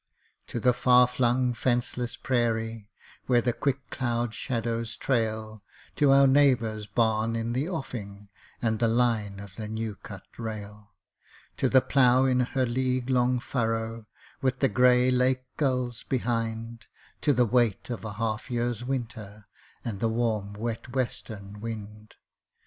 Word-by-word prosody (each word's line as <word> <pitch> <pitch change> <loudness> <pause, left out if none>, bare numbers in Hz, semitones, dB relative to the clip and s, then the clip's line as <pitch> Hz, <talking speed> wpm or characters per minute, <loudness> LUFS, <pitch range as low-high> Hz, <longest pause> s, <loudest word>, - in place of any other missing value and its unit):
_ - - -41
To 120 - -4
the 125 +2 +4
far 125 0 +5
flung 125 0 +1
fenceless 120 0 -1
prairie 115 -4 -1 0.4
Where 125 -2 +4
the 120 0 0
quick 135 0 -2
cloud 120 -2 -1
shadows 115 -1 -2
trail, 110 -4 -1 0.4
To 145 - +4
our 140 0 +7
neighbour's 125 -6 +3
barn 110 -1 +1
in 115 +1 -2
the 135 +7 -1
offing 105 - -6 0.3
And 110 -2 +1
the 115 - +3
line 110 -4 +1
of 100 -1 -11
the 110 -1 -5
new 110 0 -3
cut - - -10 0.2
rail; 105 -2 -7 0.6
To 130 - +1
the 130 0 +6
plough 130 -1 +4
in 130 -1 +2
her 130 +1 +1
league 130 +1 -1
long 125 0 +2
furrow 115 -2 -2 0.3
With 130 -1 +1
the 135 0 +2
gray 125 0 +4
Lake 130 0 +2
gulls 125 -4 -1
behind 115 -2 -3 0.3
To 145 - +3
the 125 -3 +3
weight 120 -1 +1
of 120 - -5
a 105 -2 -5
half 110 +3 -3
year's 120 -1 -1
winter 110 -5 -5 0.4
And 105 -4 -4
the 115 - +1
warm 110 -3 -1
wet 115 +3 -5
western 105 -5 -4
wind! 105 -1 -7
120 Hz, 150 wpm, -27 LUFS, 110-125 Hz, 0.6 s, our